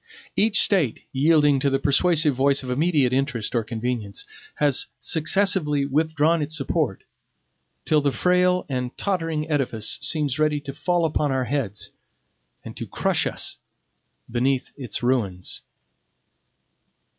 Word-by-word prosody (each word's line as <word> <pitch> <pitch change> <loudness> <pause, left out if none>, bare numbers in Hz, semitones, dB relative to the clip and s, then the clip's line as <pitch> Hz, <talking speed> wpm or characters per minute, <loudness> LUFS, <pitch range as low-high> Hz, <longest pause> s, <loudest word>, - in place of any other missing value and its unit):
Each 215 +1 +3
State, 170 - +1
yielding 145 0 +3
to 140 - +1
the 135 - +1
persuasive 155 +2 +3
voice 140 +2 +2
of 125 - -5
immediate 145 -2 +2
interest 130 -5 -1
or 120 -2 +1
convenience, 110 -3 -4 0.3
has 145 -3 +2
successively 160 -3 +2
withdrawn 155 +3 +1
its 155 +2 -1
support, 135 - -1 0.8
till 155 -1 +3
the 140 -1 +1
frail 180 +3 +2
and 125 -2 -4
tottering 165 -5 -2
edifice 130 -5 -1
seems 145 -1 0
ready 150 -1 +2
to 140 -2 -7
fall 165 +4 0
upon 150 -2 0
our 130 -1 0
heads, 115 -5 -2 0.7
and - - -8
to - - -5
crush - - 0
us - - -2 0.7
beneath 125 +2 -1
its 125 -5 -5
ruins. 105 -8 -1
145 Hz, 130 wpm, -23 LUFS, 130-160 Hz, 0.8 s, Each